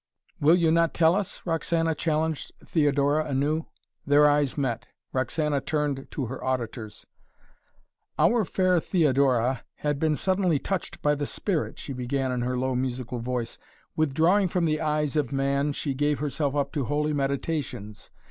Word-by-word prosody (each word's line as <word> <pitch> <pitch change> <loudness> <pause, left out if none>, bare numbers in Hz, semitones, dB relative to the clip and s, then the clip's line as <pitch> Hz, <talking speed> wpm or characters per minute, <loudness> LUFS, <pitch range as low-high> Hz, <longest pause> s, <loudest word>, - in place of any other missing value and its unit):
"Will 155 +4 +6
you 170 -3 +3
not 165 0 +2
tell 165 0 +5
us?" 200 0 -3
Roxana 165 -1 0
challenged 160 -1 -1
Theodora 145 -1 +2
anew. 150 +3 0 0.4
Their 145 +1 +5
eyes 145 -2 +2
met. 130 -5 -2 0.3
Roxana 145 +2 0
turned 145 -3 -2
to 135 - -3
her 130 +3 -6
auditors. 115 -4 -4 1.1
"Our 235 -2 +4
fair 185 -1 +2
Theodora 135 - +2
had 145 -1 -2
been 155 -1 +2
suddenly 185 -2 +1
touched 190 +6 -4
by 150 - +4
the 145 -1 -2
spirit," 180 -7 -2
she 140 - -6
began 130 +1 -1
in 125 -1 -1
her 125 +1 -1
low 130 +1 0
musical 125 -1 -3
voice. 120 -1 -3 0.4
"Withdrawing 160 +6 +3
from 175 0 0
the 155 -1 0
eyes 150 -2 0
of 145 -5 0
man 140 +1 +1
she 140 0 -2
gave 145 +2 +1
herself 145 0 -1
up 140 -1 0
to 145 -5 -1
holy 150 +4 0
meditations. 140 -6 -3
145 Hz, 155 wpm, -26 LUFS, 135-160 Hz, 1.1 s, Will